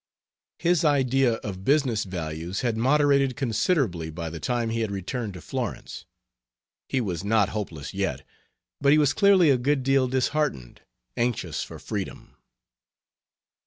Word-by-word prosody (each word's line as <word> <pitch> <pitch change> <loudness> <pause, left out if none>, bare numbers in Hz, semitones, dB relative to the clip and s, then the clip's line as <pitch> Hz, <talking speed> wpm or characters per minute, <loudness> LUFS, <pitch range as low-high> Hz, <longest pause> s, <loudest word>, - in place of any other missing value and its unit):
His 175 -1 +2
idea 135 -4 +3
of 95 -3 -6
business 135 -5 +2
values 85 0 -4
had 120 -3 0
moderated 140 +1 +3
considerably 115 - 0
by 80 0 -5
the 80 - -6
time 120 +4 -1
he 115 - -1
had 110 -2 -1
returned 100 +2 -4
to 90 - -9
Florence. - - -5 0.8
He 135 - +1
was 95 -7 -3
not 105 -1 +2
hopeless 85 -9 -5
yet, - - -2 0.5
but 140 0 +4
he - - +5
was 145 -2 +3
clearly 195 -6 +5
a 130 - +2
good 135 +1 +1
deal 135 -1 +3
disheartened 130 - -1 0.3
anxious 120 -1 -1
for - - -7
freedom. - - -6
120 Hz, 140 wpm, -25 LUFS, 95-140 Hz, 0.8 s, he